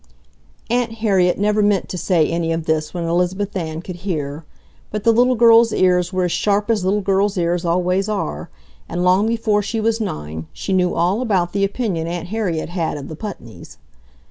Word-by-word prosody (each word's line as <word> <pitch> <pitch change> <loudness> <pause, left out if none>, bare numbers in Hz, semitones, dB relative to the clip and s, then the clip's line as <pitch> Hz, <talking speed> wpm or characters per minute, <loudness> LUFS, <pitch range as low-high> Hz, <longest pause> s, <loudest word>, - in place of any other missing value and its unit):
Aunt 240 -2 +1
Harriet 195 -5 +2
never 210 +1 +2
meant 205 -2 +2
to - - -5
say 175 -3 +2
any 165 0 -1
of 165 -1 -2
this 155 -1 0
when 175 -2 -4
Elizabeth 180 +4 -1
Ann 160 -2 -4
could 180 -1 -7
hear, 155 -5 -4 0.5
but 210 -1 -4
the 230 - +5
little 250 +2 +3
girl's 230 0 +6
ears 180 -2 +2
were 185 -1 0
as 180 - 0
sharp 205 +4 +1
as 210 -4 0
little 200 +3 +1
girls' 195 +1 +1
ears 175 0 0
always 180 +3 +1
are, 75 - -3 0.4
and 175 - -2
long 185 +4 +3
before 225 -2 +1
she 215 +3 -3
was 225 +1 0
nine 80 - -5
she 195 - -3
knew 180 -1 +2
all 180 +7 +1
about 190 -8 0
the 200 0 0
opinion 195 -5 -1
Aunt 175 0 -4
Harriet 185 -8 -2
had 170 -4 -2
of 140 - -8
the 155 - -6
Putneys. 210 +5 -9
185 Hz, 195 wpm, -20 LUFS, 170-210 Hz, 0.5 s, girl's